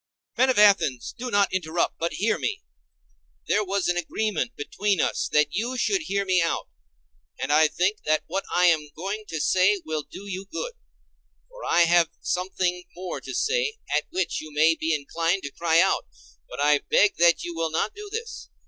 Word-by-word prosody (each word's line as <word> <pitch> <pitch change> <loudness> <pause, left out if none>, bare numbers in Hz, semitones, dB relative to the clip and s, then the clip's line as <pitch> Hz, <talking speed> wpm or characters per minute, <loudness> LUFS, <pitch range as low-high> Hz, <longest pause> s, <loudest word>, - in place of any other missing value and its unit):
Men 260 +2 +3
of 255 - +2
Athens, 195 - +4
do 250 +1 -5
not 200 -4 +2
interrupt, 170 -2 -1
but 170 +1 -1
hear 225 +3 0
me; 420 -1 -3 0.8
there 210 - +2
was 195 -1 -1
an 175 0 +1
agreement 215 +7 -2
between 195 +6 -1
us - - 0
that 150 -1 +3
you 240 +5 -2
should 385 - +1
hear 200 -4 -1
me 185 -2 +3
out. 165 - -1 0.7
And 145 - 0
I 155 +1 +6
think 185 +7 0
that 155 0 +2
what 195 +3 -3
I 180 +1 +3
am 155 -4 +3
going 200 +6 -5
to 160 - -4
say 190 +5 +3
will 155 -1 -2
do 195 - -11
you 190 0 -5
good: - - -4 0.8
for - - -12
I 175 - +3
have 170 -1 +4
something 180 -1 -2
more 180 0 -6
to - - -7
say, 460 -1 0 0.2
at - - +1
which 370 +3 -2
you 155 0 -10
may 155 +2 +4
be 160 0 -2
inclined 165 +6 -1
to 140 - -5
cry 165 +1 +2
out; 190 +2 +2 0.4
but - - -8
I 145 0 +4
beg 205 +7 +2
that 170 0 +4
you 175 - -5
will 165 -1 -1
not 160 +7 -1
do 415 0 -9
this. 460 +2 -6
180 Hz, 195 wpm, -25 LUFS, 165-210 Hz, 0.8 s, I